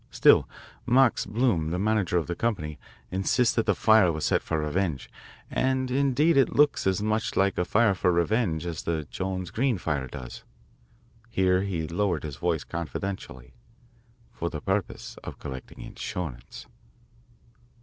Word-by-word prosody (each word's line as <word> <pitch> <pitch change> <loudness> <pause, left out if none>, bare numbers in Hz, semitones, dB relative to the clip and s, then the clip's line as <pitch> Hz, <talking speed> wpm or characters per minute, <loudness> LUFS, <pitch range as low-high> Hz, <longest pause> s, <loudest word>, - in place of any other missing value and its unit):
Still, - - +5 0.4
Max 125 0 +4
Bloom, 105 -8 +1
the 85 - -1
manager 100 -3 +1
of 85 - 0
this 85 - -4
company, 85 -10 -2 0.3
insists 95 +6 +2
that 115 - 0
the - - +3
fire 110 -5 +5
was 80 -1 -3
set - - +2
for 80 - -2
revenge, 75 -1 -2 0.4
and 130 -1 0
indeed 140 +4 +3
it 135 - +3
looks 145 -8 +3
as 95 +2 +1
much 110 +1 -1
like 100 +1 +2
a - - +2
fire 110 0 +3
for 90 -1 +1
revenge 85 -1 +1
as 85 -3 -4
the 80 -2 -2
Jones 95 -2 -3
Green 120 +1 +1
fire 75 -6 -2
does" 60 -1 -9 0.9
here 95 -3 +2
he 90 -5 -2
lowered 85 -1 -1
his 75 -3 -6
voice 85 -2 -1
confidentially 80 -5 -6 0.8
"for 85 - -3
the 75 - -5
purpose 95 0 -3
of - - -7
collecting 65 -2 -8
insurance. 75 -10 -6
95 Hz, 150 wpm, -27 LUFS, 80-110 Hz, 0.9 s, Still